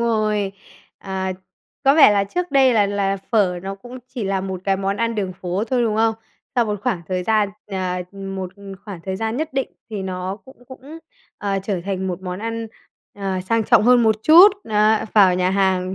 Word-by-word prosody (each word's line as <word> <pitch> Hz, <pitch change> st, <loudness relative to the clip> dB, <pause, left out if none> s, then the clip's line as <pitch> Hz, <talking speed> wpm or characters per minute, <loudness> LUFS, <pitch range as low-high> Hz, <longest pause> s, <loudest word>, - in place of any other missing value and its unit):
rồi. 215 Hz, -4 st, 0 dB, 0.5 s
Ờ, 190 Hz, -1 st, -3 dB, 0.5 s
có 275 Hz, +1 st, +6 dB
vẻ 300 Hz, -9 st, +8 dB
là 200 Hz, -1 st, +2 dB
trước 360 Hz, -, -3 dB
đây 270 Hz, -2 st, +5 dB
là 205 Hz, -2 st, +4 dB
là 200 Hz, -1 st, -1 dB
phở 190 Hz, -6 st, +2 dB
nó 195 Hz, +1 st, -5 dB
cũng 245 Hz, +5 st, -11 dB, 0.2 s
chỉ 230 Hz, -5 st, -3 dB
là 195 Hz, -1 st, -1 dB
một 190 Hz, -1 st, -5 dB
cái 195 Hz, -1 st, +1 dB
món 195 Hz, +1 st, -2 dB
ăn 230 Hz, +1 st, -1 dB
đường 195 Hz, -4 st, -2 dB
phố 180 Hz, +2 st, -3 dB
thôi, 245 Hz, +1 st, 0 dB
đúng 215 Hz, -2 st, 0 dB
không? 225 Hz, 0 st, +2 dB, 0.4 s
Sau 240 Hz, -, +3 dB
một 210 Hz, -2 st, -3 dB
khoảng 210 Hz, -9 st, -1 dB
thời 185 Hz, -1 st, -1 dB
gian 215 Hz, 0 st, +2 dB, 0.2 s
ờ, 185 Hz, -2 st, -3 dB
một 195 Hz, -2 st, -6 dB, 0.3 s
khoảng 200 Hz, -5 st, -8 dB
thời 190 Hz, 0 st, -3 dB
gian 225 Hz, +2 st, -2 dB
nhất 315 Hz, 0 st, -3 dB
định 270 Hz, 0 st, -1 dB, 0.2 s
thì 205 Hz, -3 st, -4 dB
nó 185 Hz, +1 st, -4 dB
cũng 260 Hz, -2 st, -17 dB
cũng, 280 Hz, +5 st, -11 dB, 0.4 s
ờ, 195 Hz, -1 st, -1 dB
trở 195 Hz, -3 st, -2 dB
thành 190 Hz, -1 st, -3 dB
một 180 Hz, 0 st, -4 dB
món 180 Hz, 0 st, -5 dB
ăn, 230 Hz, +1 st, -4 dB, 0.5 s
ờ, 190 Hz, -2 st, -2 dB
sang 225 Hz, +4 st, 0 dB
trọng 230 Hz, 0 st, +5 dB
hơn 245 Hz, +1 st, +5 dB
một 220 Hz, -1 st, +3 dB
chút, 345 Hz, +6 st, +9 dB, 0.2 s
á, 215 Hz, +1 st, +3 dB
vào 190 Hz, -4 st, +6 dB
nhà 180 Hz, 0 st, +1 dB
hàng. 190 Hz, -1 st, +1 dB
200 Hz, 205 wpm, -21 LUFS, 190-230 Hz, 0.5 s, chút